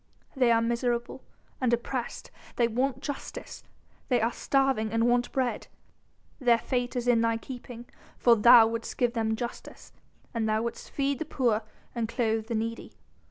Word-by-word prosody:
They 250 -3 +3
are 230 0 +3
miserable 235 +2 -1 0.4
and 250 -2 +2
oppressed, 240 +1 -3 0.2
they 235 - +3
want 255 +3 -1
justice! 285 -2 -7 0.5
They 250 -2 +3
are 230 +1 +1
starving 265 -5 +1
and 230 +1 +2
want 245 0 +1
bread. 255 -2 -1 0.7
Their 240 -4 +4
fate 245 +1 -2
is 245 0 -2
in 235 -2 +4
thy 230 0 +1
keeping 245 -1 -9 0.3
for 240 -1 +5
thou 235 +1 +8
wouldst 230 0 -4
give 245 -1 +1
them 220 -2 0
justice, 240 +1 -8 0.4
and 225 -2 -1
thou 215 +1 +1
wouldst 235 - -5
feed 275 -1 -1
the 320 - -3
poor 240 -7 +1 0.3
and 230 -2 -2
clothe 225 -3 -1
the 230 - -2
needy. 230 +1 -4
235 Hz, 160 wpm, -28 LUFS, 230-250 Hz, 0.7 s, thou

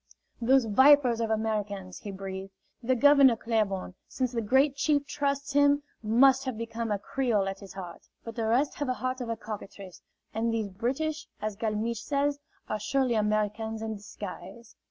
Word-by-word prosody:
"Those 260 +1 +4
vipers 255 +1 +5
of 225 - -1
Americans!" 210 -4 -2
he 205 - -8
breathed. 195 0 -6 0.3
"The 255 +2 +1
Governor 275 -1 +6
Claiborne, 215 -5 -1
since 255 -2 -2
the 235 -2 -1
Great 265 +6 +3
Chief 285 0 +1
trusts 280 0 -2
him, 285 0 +4 0.2
must 260 +5 +4
have 260 -4 -3
become 230 0 -4
a 205 - +1
Creole 215 -2 0
at 195 0 -4
his 195 -3 -11
heart. 180 -3 -9 0.2
But 230 -1 -8
the 225 -2 -1
rest 255 +6 +2
have 290 - -1
the 255 - 0
heart 255 +1 -3
of 240 - -4
a 230 - -2
cockatrice. 200 -4 -9 0.3
And 225 +1 0
these 220 -3 -1
British, 270 +10 -2
as 215 -1 -3
Galmiche 220 +1 -2
says, 285 +2 0 0.3
are 215 - -2
surely 260 +3 +1
Americans 215 +1 -1
in 220 0 -3
disguise." 205 +1 -9
230 Hz, 175 wpm, -28 LUFS, 210-265 Hz, 0.3 s, Governor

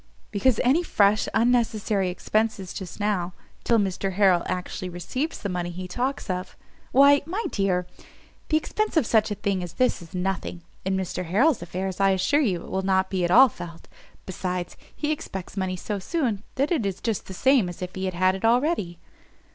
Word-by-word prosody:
"Because 220 +3 +2
any 270 +7 +4
fresh 210 - +3
unnecessary 225 -5 +1
expences 205 0 -1
just 190 0 -7
now, 195 -4 0 0.3
till 230 - +3
Mr 195 -1 -1
Harrel 185 -3 +4
actually 180 0 -4
receives 255 - -3
the 205 - -4
money 180 -2 -2
he 180 +1 -6
talks 250 +9 -2
of 185 -1 -4 0.2
" - - -32
"Why, 280 +2 +6
my 395 +7 -2
dear, 185 -3 0 0.6
the 310 - +4
expence 425 +4 -1
of 305 - +4
such 220 -1 +3
a 205 - -2
thing 195 -1 -1
as 175 -2 -6
this 255 -7 +1
is 170 +1 -11
nothing; 180 -1 -3 0.2
in 190 0 0
Mr 180 -1 -3
Harrel's 230 - +3
affairs 185 +2 -4
I 195 0 +4
assure 290 +10 +2
you 185 - 0
it - - -11
will 190 - 0
not 190 0 +1
be 185 -2 0
at 175 - +1
all 255 +9 +8
felt. 175 -6 -10 0.4
Besides, 180 -1 -4 0.2
he 300 0 -1
expects 190 - -5
money 190 -2 -1
so 200 +3 -4
soon, 235 - -1
that 275 +4 0
it 315 -10 +1
is 195 -2 -2
just 225 -4 -2
the 190 - -7
same 260 -4 +3
as 175 +1 -7
if 180 0 -6
he 190 0 -3
had 185 0 +2
it 190 - -6
already." 230 - +2
195 Hz, 195 wpm, -25 LUFS, 180-240 Hz, 0.6 s, all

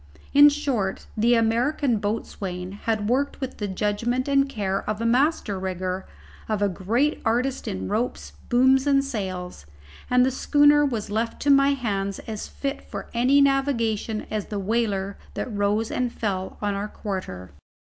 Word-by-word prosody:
In 290 +1 +9
short, 260 -10 -2
the 235 +3 +3
American 235 +2 +1
boatswain 190 -3 -4
had 210 +1 -2
worked 270 +5 0
with 265 -1 -5
the 205 - -2
judgment 210 +7 -1
and 275 0 +3
care 195 -6 -1
of 215 0 -2
a 230 - -2
master 245 - +1
rigger, 185 0 -3 0.4
of 215 -2 0
a 205 - +2
great 225 - 0
artist 250 +4 0
in 95 0 -3
ropes, 240 - -2 0.2
booms, 260 +2 +4
and 275 -1 +4
sails, 185 - -5 0.4
and 250 0 +5
the 265 - +1
schooner 290 +2 +4
was 230 -7 -2
left 225 +2 -2
to 285 - +4
my 275 0 +5
hands 200 -7 -2
as 215 -2 -5
fit 275 0 -4
for - - -8
any 255 +4 +4
navigation 235 -6 +1
as 215 -2 -2
the 210 - -4
whaler 200 -1 -1 0.2
that 245 - -4
rose 205 +2 0
and 250 -1 -1
fell 190 -5 -3
on 205 -1 +1
our 200 +1 -3
quarter. 185 - -6
225 Hz, 160 wpm, -24 LUFS, 200-265 Hz, 0.4 s, In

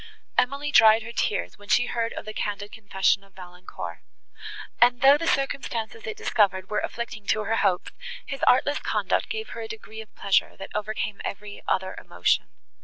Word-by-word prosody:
Emily 280 +3 +1
dried 220 -2 +7
her 230 - -7
tears 210 -3 -1
when 205 - -15
she 245 - +4
heard 230 -2 -1
of - - -7
the 215 - -6
candid 205 0 -3
confession 200 -3 +1
of 195 -1 -22
Valancourt; 180 -1 -8 0.8
and, 245 0 +5
though 275 +1 +8
the 330 +3 -2
circumstances 275 - -1
it 435 -1 -4
discovered 195 - +1
were 210 - +1
afflicting 215 -3 -5
to 215 - +2
her 225 +2 0
hopes, 180 -4 +1 0.3
his 275 -1 -6
artless 285 +3 +4
conduct - - 0
gave 440 +1 -4
her - - -6
a - - -5
degree 420 - -8
of 220 - -15
pleasure, 200 -1 +1
that 195 - -8
overcame 210 -1 -3
every 205 +1 -6
other 190 0 0
emotion. 90 0 +1
220 Hz, 180 wpm, -26 LUFS, 200-250 Hz, 0.8 s, though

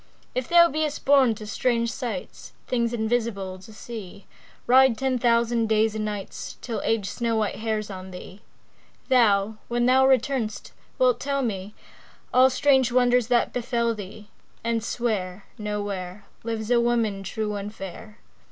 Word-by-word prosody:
If 255 -1 -3
thou 340 0 +7
be'st 305 -1 -2
born 270 -5 +5
to 215 - -9
strange 235 +2 0
sights, 225 -8 -6
Things 235 -2 0
invisible 220 -5 -2
to 190 +4 -14
see, 210 -3 -9 0.4
Ride 260 -1 +5
ten 265 -2 0
thousand 235 -1 +2
days 220 0 +2
and 215 0 -3
nights 205 -2 -6
Till 235 -3 -4
Age 220 -3 0
snow 230 +2 -1
white 215 -2 -1
hairs 215 -1 -2
on 185 0 -8
thee; 185 +2 -10 0.7
Thou, 215 -4 +3
when 240 0 0
thou 260 +1 +5
return'st 255 -4 0 0.3
wilt 255 -2 +3
tell 275 0 -1
me 205 -3 -4 0.6
All 255 +1 +6
strange 265 -1 +3
wonders 245 -1 +3
that 240 -1 +2
befell 235 -1 0
thee, 205 0 -10 0.3
And 230 -1 -1
swear 205 -6 -2
No 210 -1 -3
where 190 -1 -6 0.2
Lives 225 0 -3
a 240 -1 +5
woman 230 -4 0
true 210 +2 -3
and 205 0 -5
fair. 210 +2 -9
225 Hz, 150 wpm, -25 LUFS, 210-245 Hz, 0.7 s, thou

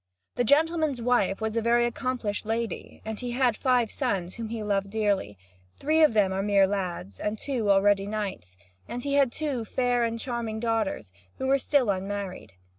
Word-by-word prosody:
The 245 - 0
gentleman's 310 +1 +2
wife 230 -4 +1
was 220 0 -2
a 230 - +2
very 240 +1 +3
accomplished 240 -3 -2
lady; 225 +1 -4
and 220 -1 -4
he 245 -1 -4
had 250 -2 +2
five 245 -2 +2
sons, 190 -9 -2
whom 230 -2 -6
he 230 - -4 0.3
dearly 205 - +1
loved, 90 -1 -31
three 315 +2 +2
of 300 -7 +5
them 195 -2 +2
mere 200 -1 +5
lads, 180 - -4
and 210 +1 -2
two 240 -4 -2
already 200 0 +4
knights; 195 - -5 0.3
and 245 0 -5
he 280 - -1
had 280 -3 +4
two 280 -6 -2
fair 245 +1 +1
and 230 0 -1
charming 235 -3 -3
daughters, 225 - -1 0.3
who - - -3
were 275 +1 +3
still 260 -5 +2
unmarried. 195 - -5
225 Hz, 180 wpm, -27 LUFS, 200-250 Hz, 0.3 s, of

